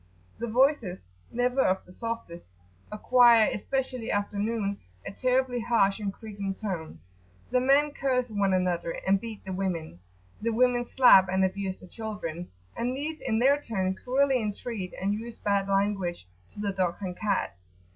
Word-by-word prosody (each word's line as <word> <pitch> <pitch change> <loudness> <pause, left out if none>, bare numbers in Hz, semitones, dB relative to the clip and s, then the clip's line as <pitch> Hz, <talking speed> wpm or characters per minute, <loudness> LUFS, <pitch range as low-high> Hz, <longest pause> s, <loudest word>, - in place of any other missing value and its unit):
[p.75]Their 235 - -3
voices, 235 - +1 0.2
never 250 +2 +1
of 190 +1 +1
the 180 - -15
softest, 230 - -6 0.4
acquire, 235 +1 +5
especially 255 +1 -3
after 205 0 -1
noon, 205 -2 -1 0.3
a - - -5
terribly 255 +2 +1
harsh 225 -4 +2
and 205 -2 -2
creaking 200 -2 -6
tone. 175 - -5 0.5
The 250 - +3
men 280 +3 +3
curse 255 -4 -1
one 200 -2 +1
another[FN#1] 180 -2 0
and 195 0 +3
beat 225 -3 -8
the 190 - -4
women. 175 - -3 0.4
The 230 - 0
women 245 +1 +2
slap 195 -8 +6
and 190 +1 +2
abuse 190 0 -3
the 185 - -12
children, 195 -6 -6 0.3
and 250 +2 -2
these 310 +3 -4
in 225 -4 0
their 275 +5 +4
turn 190 -7 -1
cruelly 260 +4 +1
entreat, 210 -2 -4
and 195 +2 0
use 230 +2 -6
bad 200 -1 0
language 195 - 0 0.3
to, - - -11
the 205 -1 -1
dogs 185 0 -1
and 180 -2 -4
cats. 200 - -1
210 Hz, 160 wpm, -28 LUFS, 190-245 Hz, 0.5 s, slap